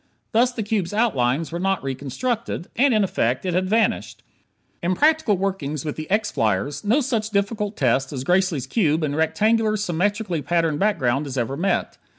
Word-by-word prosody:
Thus 245 +3 +3
the 230 -3 -4
cube's 205 -3 -1
outlines 160 - +1
were 170 - -3
not 195 -2 0
reconstructed; 145 - -3
and, 275 +3 +4
in 215 -3 +3
effect, 130 -6 0
it 180 - -1
had 185 +1 0
vanished. 225 +2 0 0.6
In 180 +2 0
practical 305 - +3
workings 160 -7 -3
with 150 - -3
the 155 - -7
X 210 +2 +1
flyers, 110 - -1
no 230 +8 +3
such 230 -5 -1
difficult 205 0 -1
test 135 +1 +1
as 130 -3 -4
Gracely's 180 -4 +1
cube 160 -7 +1
and 145 -1 -1
rectangular, 215 +8 +2
symmetrically 200 -2 -1
patterned 165 +1 0
background 145 - +1
is 135 -1 -5
ever 125 +2 -1
met. 190 +6 -1
185 Hz, 170 wpm, -22 LUFS, 145-215 Hz, 0.6 s, and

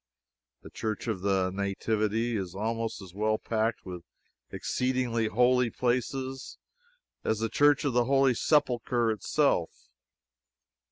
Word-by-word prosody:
The - - -11
Church 110 -2 -4
of 105 -5 -2
the 95 -1 +1
Nativity 110 +4 -1
is 95 -3 -4
almost 115 +1 -3
as 90 -2 -12
well 110 +2 +1
packed 110 +1 -1
with 90 -2 -7 0.5
exceeding 125 -1 -1 0.2
holy 125 +2 +3
places 130 +2 -2 0.7
as 110 - 0
the 115 +1 -1
Church 145 +2 +3
of 140 - +1
the 120 0 +3
Holy 135 0 +4
Sepulchre 120 -4 +1
itself. 110 -3 0
115 Hz, 120 wpm, -28 LUFS, 105-125 Hz, 0.7 s, Holy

